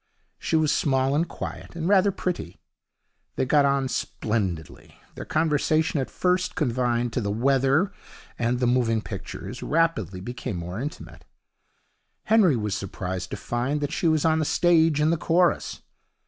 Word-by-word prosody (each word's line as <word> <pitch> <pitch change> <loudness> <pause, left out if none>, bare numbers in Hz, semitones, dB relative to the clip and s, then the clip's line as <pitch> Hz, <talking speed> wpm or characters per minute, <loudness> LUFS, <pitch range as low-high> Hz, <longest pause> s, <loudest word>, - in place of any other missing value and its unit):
She - - -1
was 155 -2 +3
small 135 -1 +1
and 160 +3 +1
quiet, - - -7
and 165 0 -3
rather 200 0 +4
pretty. 180 - -4 0.8
They - - 0
got 145 +2 +4
on 140 -1 +1
splendidly. 100 - -3
Their - - -8
conversation, 155 0 +1
at 130 - -2
first 180 0 0
confined 120 -3 0
to 125 - 0
the 100 - -2
weather 135 - +2 0.5
and 120 +1 0
the 125 - +1
moving 120 -3 +1
pictures, - - -7
rapidly 145 - 0
became 120 0 -5
more 90 +4 -5
intimate. 150 +2 -7 1.0
Henry 215 - +4
was 105 -3 -2
surprised 95 -2 -4
to - - -5
find 125 +5 -2
that 145 0 -2
she 170 - 0
was 155 -1 +2
on 160 0 +3
the - - +1
stage, 160 -2 +3
in 155 +2 +3
the 170 - +1
chorus. 170 +2 +1
140 Hz, 155 wpm, -25 LUFS, 115-160 Hz, 1.0 s, rather